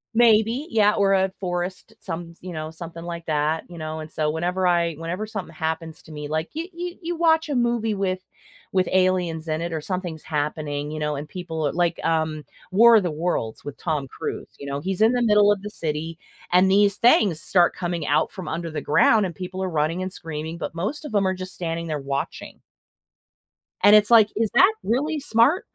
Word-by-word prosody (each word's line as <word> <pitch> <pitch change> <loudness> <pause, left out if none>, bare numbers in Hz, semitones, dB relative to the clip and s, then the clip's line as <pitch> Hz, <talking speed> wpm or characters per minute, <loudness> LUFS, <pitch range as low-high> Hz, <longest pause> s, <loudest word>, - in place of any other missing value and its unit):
Maybe, 230 +4 +4
yeah, 210 -2 +4
or 195 -1 +3
a 190 0 +2
forest, 180 0 -4
some 170 -1 -6
s 170 - -19
you 180 -1 -7
know, 155 -1 -4
something 165 0 -9
like 170 -1 -6
that, 155 +1 0
you 175 -2 -10
know, 155 0 -5
and 155 0 -8
so 155 -1 -1
whenever 180 +4 0
I 170 -1 +2
whenever 165 +6 -4
something 200 -6 -6
happens 160 0 -4
to 160 - -14
me, 150 -1 -6
like 155 +2 -2
you 330 +3 -4
you 350 0 -6
you 345 0 -3
watch 320 -1 +3
a 285 - -1
movie 235 -3 +1
with 185 -1 -1 0.5
with 185 -1 +2
aliens 180 -3 +1
in 155 0 -1
it, 170 0 -3
or 160 - -2
something's 180 -3 -4
happening, 150 -1 -3
you 155 - -5
know, 150 -1 -1
and 145 +2 -6
people 160 -4 -3
a - - -1
like, 175 -1 0
um, 155 -2 0 0.3
War 230 +4 +7
of 210 - +2
the 175 - -1
Worlds 150 -8 -2
with 145 -1 -7
Tom 150 -5 -2
Cruise, - - -6
you 140 - -7
know, 140 0 -3
he's 190 +3 -3
in 225 +2 +5
the 245 - +1
middle 210 -3 +5
of 205 -2 0
the 210 - -5
city, 160 -1 -4 0.3
and 180 +2 +5
these 200 +1 +4
things 205 -9 +4
start 175 +2 +3
coming 175 -3 -3
out 150 +2 +1
from 185 - -8
under 165 +1 -3
the 155 -2 -4
ground, 210 +7 +4
and 180 - -4
people 185 +3 -5
are 190 - -1
running 160 +2 0
and 185 0 -5
screaming, 160 -1 -6
but - - -5
most 215 - -3
of 265 - -7
'em 200 -1 +3
are 185 - +1
just 185 0 -7
standing 170 -1 -3
there 155 -2 -2
watching. 140 0 -5 1.2
And 205 +1 +8
it's 210 +2 +5
like, 220 -3 +7
is 220 0 +1
that 375 - +6
really 295 +7 0
smart? 280 - +3
175 Hz, 215 wpm, -23 LUFS, 160-205 Hz, 1.2 s, And